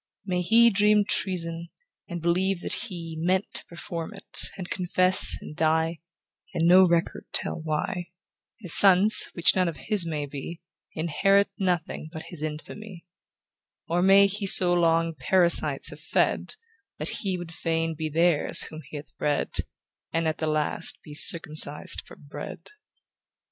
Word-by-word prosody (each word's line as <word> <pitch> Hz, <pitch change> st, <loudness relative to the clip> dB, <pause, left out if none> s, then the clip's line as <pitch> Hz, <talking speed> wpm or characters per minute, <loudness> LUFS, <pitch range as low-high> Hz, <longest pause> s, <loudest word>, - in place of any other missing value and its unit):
May 180 Hz, -2 st, -3 dB
he 230 Hz, +5 st, +3 dB
dream 210 Hz, 0 st, +2 dB
treason, 170 Hz, -3 st, 0 dB, 0.4 s
and 175 Hz, -2 st, -7 dB
believe 180 Hz, +2 st, -1 dB
that -, -, -6 dB
he 165 Hz, -3 st, -7 dB
Meant 185 Hz, +4 st, -1 dB
to -, -, +2 dB
perform 170 Hz, +2 st, -9 dB
it, 195 Hz, -, +2 dB
and 185 Hz, -2 st, -8 dB
confesses, 185 Hz, 0 st, +4 dB
and 150 Hz, -, -11 dB
die, 160 Hz, +1 st, -1 dB, 0.6 s
And 165 Hz, 0 st, 0 dB
no 185 Hz, +1 st, +5 dB
record 170 Hz, -1 st, -2 dB
tell -, -, -1 dB
why; 175 Hz, +3 st, -4 dB, 0.5 s
His 180 Hz, -7 st, +5 dB
sons, 195 Hz, +2 st, +7 dB
which 170 Hz, -, +1 dB
none 185 Hz, -1 st, 0 dB
of 165 Hz, -, -6 dB
his 205 Hz, -6 st, +2 dB
may 150 Hz, -3 st, -4 dB
be, 145 Hz, +4 st, -9 dB, 0.3 s
Inherit 195 Hz, +6 st, 0 dB
nothing 175 Hz, -4 st, -4 dB
but 160 Hz, -1 st, -9 dB
his 170 Hz, -4 st, -7 dB
infamy; 170 Hz, +5 st, -9 dB, 0.8 s
Or 175 Hz, +1 st, -1 dB
may 195 Hz, +2 st, +5 dB
he 200 Hz, +1 st, -3 dB
so 180 Hz, -1 st, +5 dB
long 165 Hz, -1 st, 0 dB
parasites 170 Hz, +5 st, +1 dB
have -, -, -12 dB
fed, -, -, -2 dB, 0.4 s
That -, -, -5 dB
he 190 Hz, -3 st, -4 dB
would 175 Hz, -2 st, -10 dB
fain 165 Hz, 0 st, -3 dB
be 155 Hz, 0 st, -6 dB
theirs 165 Hz, 0 st, +1 dB
whom 155 Hz, 0 st, -10 dB
he -, -, -11 dB
hath 145 Hz, -, -13 dB
bred, 145 Hz, -1 st, -3 dB, 0.6 s
And 165 Hz, 0 st, -2 dB
at 155 Hz, -, -4 dB
the 155 Hz, -, -3 dB
last 155 Hz, +2 st, 0 dB
be 150 Hz, -, -13 dB
circumcised 155 Hz, -1 st, +2 dB
for -, -, -14 dB
bread. 145 Hz, -, -11 dB
170 Hz, 155 wpm, -24 LUFS, 160-190 Hz, 0.8 s, sons